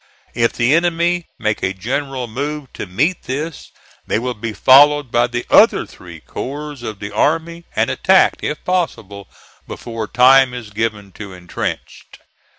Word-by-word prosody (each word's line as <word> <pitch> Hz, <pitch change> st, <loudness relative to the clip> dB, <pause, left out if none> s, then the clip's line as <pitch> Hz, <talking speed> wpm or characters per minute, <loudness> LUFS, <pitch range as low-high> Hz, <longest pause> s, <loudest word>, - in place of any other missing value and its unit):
If 115 Hz, -1 st, +1 dB
the 120 Hz, +4 st, +2 dB
enemy 170 Hz, +1 st, +1 dB
make 110 Hz, 0 st, -2 dB
a 95 Hz, -, -1 dB
general 130 Hz, +5 st, -3 dB
move 140 Hz, +4 st, -5 dB
to -, -, -6 dB
meet 145 Hz, -, 0 dB
this, 150 Hz, +4 st, -5 dB, 0.4 s
they -, -, 0 dB
will 125 Hz, +2 st, -2 dB
be 115 Hz, 0 st, -5 dB
followed 145 Hz, +3 st, +5 dB
by 120 Hz, 0 st, +2 dB
the 120 Hz, 0 st, -4 dB
other -, -, +5 dB
three -, -, -13 dB
corps 145 Hz, 0 st, -7 dB
of 110 Hz, -4 st, -6 dB
the 100 Hz, +1 st, -7 dB
army, 165 Hz, +9 st, -1 dB
and -, -, +1 dB
attacked, -, -, +3 dB
if 150 Hz, -, -4 dB
possible, 115 Hz, -, -3 dB, 0.4 s
before 115 Hz, -2 st, -6 dB
time 125 Hz, +2 st, +5 dB
is 115 Hz, -4 st, -8 dB
given 105 Hz, -2 st, -3 dB
to 100 Hz, 0 st, -10 dB
intrench. 90 Hz, -1 st, -6 dB
125 Hz, 155 wpm, -18 LUFS, 110-150 Hz, 0.4 s, followed